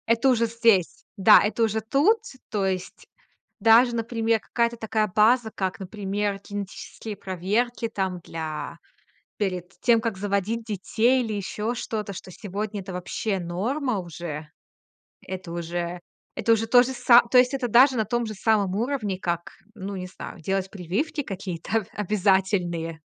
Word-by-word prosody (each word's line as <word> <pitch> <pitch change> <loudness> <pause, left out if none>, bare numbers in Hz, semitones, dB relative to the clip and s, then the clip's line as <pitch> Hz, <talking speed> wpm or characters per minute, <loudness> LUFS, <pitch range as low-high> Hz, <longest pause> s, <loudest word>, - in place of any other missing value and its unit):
Это 230 +3 +3
уже 235 -2 +3
здесь. 225 -6 +2
Да, 210 +2 +8
это 220 +2 0
уже 220 0 +1
тут. 290 - +3 0.3
То 205 -3 0
есть 185 -1 -4 0.5
даже, 235 +2 +6
например, 230 -1 0
какая-то 235 +2 -1
такая 220 -1 0
база, 220 +2 +4
как, 190 -2 -3
например, 200 +1 -3
генетические 205 +1 -6
проверки 205 +6 -1
там 190 -4 -2
для 160 -1 -6 0.6
перед 185 -3 -2
тем, 235 -2 +4
как 225 -3 -2
заводить 205 +3 -1
детей, 225 +5 +1
или 220 - -3
ещё 210 +3 -3
что-то, 215 -4 -4
что 185 - -9
сегодня 205 +2 -5
это 190 0 -8
вообще 185 +3 -2
норма 220 - -1
уже. 165 -3 -6 0.8
Это 185 -2 -6
уже 175 +1 -4 0.4
это 230 0 +2
уже 225 0 +2
то 245 +2 +7
же 255 +1 -3
са 245 -1 +6
то 255 - +6
есть 250 +2 +4
это 265 -2 -1
даже 255 +4 +6
на 220 - +1
том 240 +3 -1
же 215 - -5
самом 200 -2 +1
уровне, 220 -5 -1
как, 170 -2 -3 0.2
ну, 200 -1 -6
не 185 -1 -5
знаю, 180 -1 -9
делать 190 +3 -1
прививки 205 - -2
какие-то 195 0 -3
обязательные. 190 -5 0
210 Hz, 150 wpm, -25 LUFS, 185-230 Hz, 0.8 s, Да